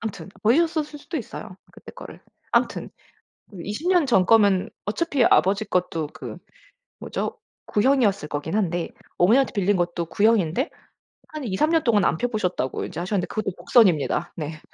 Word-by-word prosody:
암튼 220 -3 -6
버리셨었을 305 +4 +1
수도 335 +3 -6
있어요 215 -6 -7 0.2
그때 - - -13
거를. - - -11 0.3
암튼 - - 0 0.7
20 215 - -4
년 355 -6 +4
전거면 200 -3 +4 0.2
어차피 275 +2 +1
아버지 200 +1 +3
것도 180 -6 -1
그 - - -8 0.6
뭐죠? - - -4 0.3
구형이었을 210 - +2
거긴 150 +4 -4
한데 175 -5 -1 0.3
어머니한테 235 +10 +4
빌린 200 -1 +1
것도 175 -1 -1
구형인데 215 - +1 0.6
한 305 -2 -7
2-3 235 +8 0
년 325 -2 +3
동안 215 -5 +3
안 - - +2
펴 245 - 0
보셨다고 180 - -2
이제 170 -2 -7
하셨는데 185 0 -1
그것도 215 -2 -3
복선입니다. 175 - +2
네. 155 0 -5
205 Hz, 325 characters per minute, -23 LUFS, 180-255 Hz, 0.7 s, 년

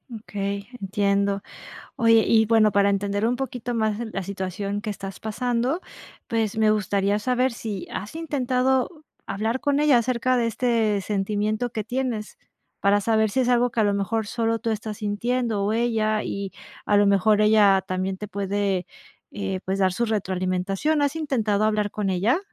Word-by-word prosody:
Okey, 200 -2 -4
entiendo. 200 0 +1 0.6
Oye, 230 -1 +5
y 220 -1 +4
bueno, 220 -2 +4
para 200 0 +4
entender 200 +2 0
un 245 - +1
poquito 245 -2 -4
más 220 -1 0
la 195 - -3
situación 200 +1 -4
que 215 - -4
estás 195 -1 -7
pasando, 245 - -1 0.5
pues 225 -1 -1
me 215 -1 +4
gustaría 200 0 +1
saber 255 +2 +1
si, 210 -5 -5
¿has 205 +7 -6
intentado 265 -5 0 0.4
hablar 220 +5 -2
con 285 0 +1
ella 295 -5 +5
acerca 255 +1 +1
de 235 -1 +1
este 225 -3 +1
sentimiento 210 +4 -1
que 215 -3 -4
tienes? 240 -3 -3 0.4
Para 200 +1 +3
saber 220 0 +2
si 260 - +1
es 250 - +1
algo 245 0 +3
que 230 - -1
a - - +4
lo 205 - +2
mejor 210 +2 -1
solo 230 +1 0
tú 230 -1 -1
estás 215 -1 -4
sintiendo, 220 0 -1
o 210 - +1
ella, 220 -2 +1
y 200 -1 -4 0.3
a 205 - +3
lo 205 0 +5
mejor 205 +2 +4
ella 210 -3 +5
también 185 0 -2
te 210 +2 -7
puede, 200 -2 -1 0.5
eh, 195 -2 -3
pues 190 +1 -2
dar 185 -1 +3
su 235 - 0
retroalimentación, 195 +6 0
¿has 285 +2 0
intentado 225 -9 0
hablar 210 -1 +1
con 205 -2 -2
ella? 200 - +2
215 Hz, 170 wpm, -24 LUFS, 200-235 Hz, 0.6 s, Oye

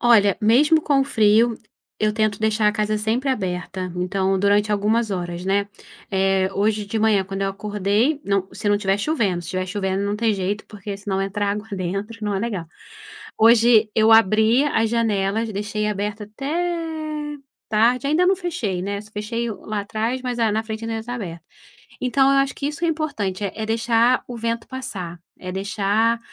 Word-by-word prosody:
Olha, 210 -5 +5
mesmo 295 +9 +5
com 280 -2 +2
o - - +2
frio, 225 -2 +3 0.4
eu 215 0 +1
tento 215 -2 0
deixar 220 0 +2
a - - +1
casa 215 0 0
sempre 235 +6 0
aberta, 185 -4 -3
então 190 +1 0
durante 205 +2 +2
algumas 215 +2 +1
horas, 175 -2 -4
né. 200 +1 +1 0.4
Eh, 190 -1 +2
hoje 210 +1 0
de 205 +2 -3
manhã, 215 -3 +3
quando 195 +1 -5
eu 195 - +1
acordei, 210 +7 0
não 195 -2 0
se 205 +1 -3
não 205 - +4
estiver 195 -1 0
chovendo, 205 - 0
se 170 - -10
estiver 185 +1 -2
chovendo 190 0 -2
não 205 0 -1
tem 220 0 +1
jeito 200 +2 -3
porque 205 -1 -7
senão 200 -1 -2
entra 205 +1 -2
água 205 +2 -2
dentro, 195 +4 -4
não 205 -1 -1
é - - 0
legal. 200 -6 -3 0.7
Hoje 225 -1 +5
eu 220 0 +5
abri 220 +4 +5
as 225 -6 +1
janelas, 220 -1 0
deixei 210 +1 -2
aberta 210 0 -3
até 215 +7 -8 1.2
tarde, 235 +5 +2
ainda 315 +5 +3
não 380 +2 +4
fechei, 235 - -3
né, 200 +2 -3
só 215 +1 -16
fechei 230 +3 -3
lá 215 0 -5
atrás, 225 +5 -2
mas 250 -1 -3
a 225 -2 +2
na 220 +1 0
frente 220 0 -5
ainda 225 -1 -3
tá 245 +2 -5
aberta. 170 -8 -7 0.6
Então, 265 +2 +3
eu 275 - +4
acho 275 0 +1
que 280 - -4
isso 320 +3 -4
é - - +2
importante, 250 - -2
é 195 - -2
é 220 0 -3
deixar 230 +2 +2
o 245 - -6
vento 230 0 -3
passar, 200 -10 -6 0.2
é 185 - -6
deixar, 205 +4 +1
215 Hz, 185 wpm, -22 LUFS, 195-230 Hz, 1.2 s, Olha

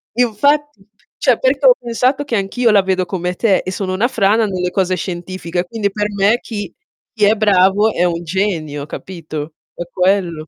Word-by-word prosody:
infatti 250 0 +1 0.3
cioè 255 -4 +2
perché 270 +1 +1
ho 250 - +8
pensato, 250 +4 0
che 245 -5 -3
anch'io 225 +4 +1
la 200 -2 +5
vedo 185 -1 0
come 180 0 -3
te 205 -3 +2
e 185 - -5
sono 185 -1 -3
una 220 +6 +1
frana 220 -1 +2
nelle 180 -2 -2
cose 185 -1 0
scientifiche, 175 0 -4
quindi 205 0 -2
per 210 +1 -2
me 200 +4 +2
chi 205 -6 -6 0.4
chi 210 - +3
è 215 +2 +4
bravo 205 0 +3
è 175 - 0
un 170 -1 -1
genio, 160 -5 -2
capito? 155 -3 -7 0.2
È - - -4
quello. 180 -4 0
195 Hz, 180 wpm, -17 LUFS, 180-225 Hz, 0.4 s, ho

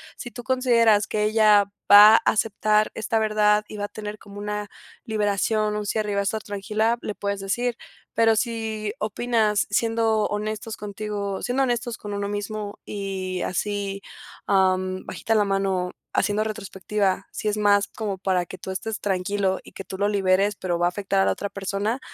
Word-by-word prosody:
Si 240 - -8
tú 245 - -8
consideras 235 -5 +3
que 210 0 0
ella 215 -1 +5 0.3
va 205 +1 +11
a - - +8
aceptar 215 0 +1
esta 225 +1 -1
verdad 210 -1 +3
y - - -9
va 205 - -2
a - - -5
tener 210 0 -7
como 205 0 -13
una 210 0 -4 0.4
liberación, 215 0 0
un 210 0 -3
cierre 210 -1 -1
y - - -1
va - - +2
a - - -1
estar 215 +2 -1
tranquila, 215 +3 -1
le 210 - -4
puedes 200 -1 -3
decir. 235 +5 -1 0.4
Pero 225 -1 +4
si 220 -2 -2
opinas 220 -1 +1
siendo 225 0 +2
honestos 215 +1 -3
contigo 205 -1 -4
siendo 255 +2 0
honestos 240 -2 -1
con 205 -1 -7
uno 200 0 -2
mismo 205 0 -4
y 190 -2 -4
así, 200 +1 -2 0.4
am, 185 -1 +1
bajita 225 - -2
la 210 - +3
mano 195 -2 0 0.2
haciendo 210 0 +1
retrospectiva. 200 -2 -2
Si - - -4
es 210 - +1
más 205 -1 +3
como 205 -2 -4
para 185 -1 0
que 185 - -9
tú 190 - -7
estés 210 +3 -4
tranquilo 190 0 0
y - - -14
que - - -7
tú 190 - -7
lo 205 +1 +1
liberes, 200 0 +2
pero 175 -3 -2
va 175 - +3
a - - +2
afectar 195 +1 -1
a - - +3
la - - +3
otra 200 - -3
persona, 200 +5 -2
210 Hz, 185 wpm, -24 LUFS, 200-215 Hz, 0.4 s, va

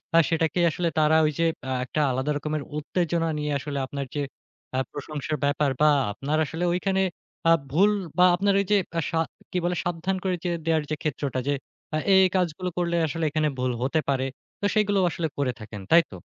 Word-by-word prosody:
আ - - +7
সেটাকেই 165 +1 +2
আসলে 175 +1 -1
তারা 155 0 +4
ঐযে 155 +2 +1 0.2
অ্যা 130 0 -2
একটা 155 - -3
আলাদা 130 +4 -1
রকমের 150 -1 -3
উত্তেজনা 165 +1 0
নিয়ে 150 0 -2
আসলে 140 0 -4
আপনার 140 0 -4
যে 145 - 0 0.5
আ - - +2
প্রশংসার 150 +1 -4
ব্যাপার 145 0 +2
বা 150 - +7 0.2
আপনার 145 +8 -2
আসলে 165 +5 -4
ঐখানে 190 +1 +1 0.5
আ - - +7 0.2
ভুল 200 +7 +5 0.3
বা 180 - +7
আপনার 200 +2 +2
ওইযে 205 +1 +3 0.2
আ - - +3
সা 165 - 0 0.3
কী 180 - -1
বলে 175 0 +1
সাবধান 175 +2 -1
করে 185 -1 +1 0.3
দেয়ার 160 -2 +2
যে - - +1
ক্ষেত্রটা 140 -3 -2
যে 145 - +3 0.4
এ, - - +2 0.2
এ - - +7 0.2
কাজগুলো 180 0 0
করলে 170 -1 0
আসলে 165 +2 -3
এখানে 155 +1 +1
ভুল 125 0 0
হতে 150 +4 +1
পারে, 135 -1 +1 0.3
তো 205 - -2
সেগুলোও 205 -3 +3
আসলে 160 +1 -1
করে 135 -3 +1
থাকেন। 105 -2 -8
তাই 170 +1 +8
তো? - - -14
155 Hz, 190 wpm, -25 LUFS, 145-175 Hz, 0.5 s, তাই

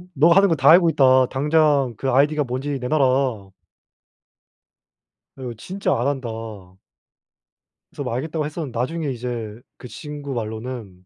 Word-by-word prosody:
네가 165 +5 +5
하는 195 0 +5
거 165 - +2
다 135 -1 +3
알고 170 +1 +7
있다. 130 -4 +4
당장 145 -2 +1
그 135 - -2
아이디가 145 +3 +2
뭔지 135 +3 -4
내놔라. 130 -6 0 1.8
어 135 - -13
이거 125 -2 -5
진짜 190 - -2
안 120 - 0
한다. 135 -4 -2 1.6
그래서 - - -6
뭐 - - -4
알겠다고 155 +4 -3
했었는데 150 -5 -6
나중에 150 +5 -2
이제 120 -3 -6 0.2
그 125 - -10
친구 145 +1 -7
말로는 110 -4 -6
135 Hz, 290 characters per minute, -21 LUFS, 125-150 Hz, 1.8 s, 알고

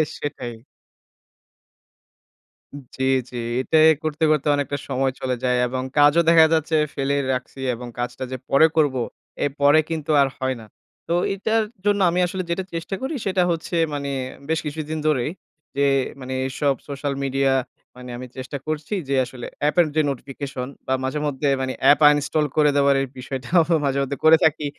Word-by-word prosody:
সেটাই। 125 -4 -5 2.4
জি, 130 - -3 0.3
জি। - - -11 0.2
এটাই 155 +4 +4 0.2
করতে, 155 0 -2
করতে 150 -1 +1
অনেকটা 145 0 -2
সময় 135 +1 0
চলে 130 -1 -1
যায় 125 -1 +2
এবং 130 +1 -3
কাজও 145 +3 +6
দেখা 165 -1 +7
যাচ্ছে 160 0 +1 0.2
ফেলেই 140 +1 0
রাখছি 130 +1 -6
এবং 120 +1 -7
কাজটা 120 +1 -3
যে 130 - -3
পরে 150 +4 +6
করবো, 145 -5 +2 0.4
এ - - +3
পরে 145 +2 +6
কিন্তু 160 -2 -2
আর 140 - +4
হয় 130 0 -1
না। - - -12 0.4
তো 170 - 0 0.2
এইটার 220 +3 0 0.2
জন্য 205 0 +3
আমি 175 +1 0
আসলে 185 +1 -4
যেটা 190 +2 -1
চেষ্টা 165 +4 -3
করি 265 +4 -3
সেটা 190 -2 +1
হচ্ছে, 165 +1 -3 0.2
মানে 140 -1 -3 0.4
বেশ 160 0 +1
কিছুদিন 155 +1 -4
ধরেই, 150 -2 +1 0.4
যে 140 - 0 0.4
মানে 130 0 -5
এসব 140 +1 0
সোশ্যাল 140 0 -3
মিডিয়া 135 0 +1 0.4
মানে 125 0 -10
আমি 125 +1 -7
চেষ্টা 130 +2 -5
করছি 155 +4 -3 0.2
যে - - +1
আসলে 125 -1 -9 0.2
অ্যাপের 150 +4 +3
যে 155 - +4
notification 135 -1 -5 0.2
বা, 130 - +1
মাঝেমধ্যে 145 +1 -2
মানে 130 0 -2 0.2
app 145 - +4
uninstall 150 +1 +1
করে 150 -1 +5
দেওয়ার 140 -1 +4
এই 135 - -2
বিষয়টাও 130 +6 0 0.2
মাঝেমধ্যে 140 0 -1
করে 160 +1 +8
থাকি। 155 -1 +2
145 Hz, 160 wpm, -22 LUFS, 130-155 Hz, 2.4 s, করে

